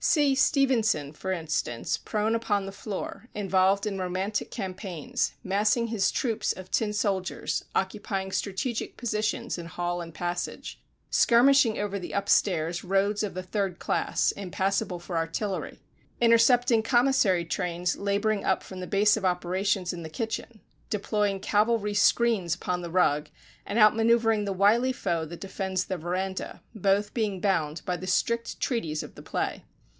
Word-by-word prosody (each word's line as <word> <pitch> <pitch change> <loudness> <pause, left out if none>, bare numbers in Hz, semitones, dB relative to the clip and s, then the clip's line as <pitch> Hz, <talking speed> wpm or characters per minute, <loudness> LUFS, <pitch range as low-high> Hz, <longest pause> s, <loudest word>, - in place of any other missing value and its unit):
See 290 -3 +4
Stevenson, 240 - +2
for 190 +5 -4
instance, 160 -9 -1
prone 215 +1 -1
upon 215 -4 0
the 195 - -6
floor, 210 +4 -6
involved 195 0 +2
in 200 -2 -2
romantic 185 +3 -2
campaigns, 185 -4 -3
massing 210 +4 +1
his 215 -4 +1
troops 230 -4 0
of 185 0 -11
tin 215 -2 +1
soldiers, 200 -3 -1
occupying 190 0 -2
strategic 210 +5 -3
positions 225 -1 -2
in 170 - -7
hall 175 +1 -3
and 165 -1 -8
passage, 175 +1 -4 0.3
skirmishing 245 -1 +5
over 200 -1 -2
the 175 - -7
upstairs 170 -4 +1
"roads 195 +2 +1
of 205 -4 -3
the 185 - -4
Third 190 -1 -2
Class, - - 0
impassable 190 -1 -2
for 175 +1 -7
artillery," 175 +5 -3 0.4
intercepting 235 0 +5
commissary 240 -7 +3
trains 175 0 -1
labouring 200 +1 0
up - - +1
from 185 - -9
the 180 - -5
Base 210 +1 +4
of 220 - -4
Operations 185 +1 0
in 175 - -6
the 160 - -7
kitchen, 225 +5 -5 0.3
deploying 205 -1 0
cavalry 210 +1 +1
screens 205 -4 +3
upon 180 0 -3
the 170 - -6
rug, 150 -4 +2 0.4
and 205 - -2
out 215 -1 +7
manoeuvering 225 -1 +3
the 200 - -2
wily 210 +7 +3
foe 170 -9 -2
that 170 +2 -9
defends 190 -1 -2
the 190 - -3
verandah, 185 +3 -4
both 205 0 +1
being 210 -5 -1
bound 165 -6 0
by 180 - -1
the 180 +2 -7
strict 235 +5 0
treaties 165 - -1
of - - -10
the - - -12
play. - - -3
195 Hz, 150 wpm, -27 LUFS, 180-220 Hz, 0.4 s, out